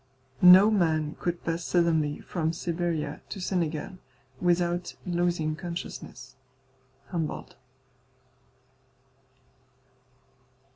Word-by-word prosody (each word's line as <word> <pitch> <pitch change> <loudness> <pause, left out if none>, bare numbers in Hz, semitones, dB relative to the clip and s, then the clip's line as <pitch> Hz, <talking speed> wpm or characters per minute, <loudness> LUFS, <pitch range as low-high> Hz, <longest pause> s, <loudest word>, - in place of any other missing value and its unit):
"No 185 +4 +9
man 160 -6 +1
could 175 -1 -3
pass 165 0 -2
suddenly 160 -4 +1
from 160 -2 -2
Siberia 165 -3 -2
into 195 - -8
Senegal 180 -1 -2 0.4
without 175 0 0
losing 175 -3 0
consciousness." 155 -6 -7 0.8
HUMBOLDT. 165 -4 -4
170 Hz, 70 wpm, -27 LUFS, 155-175 Hz, 0.8 s, No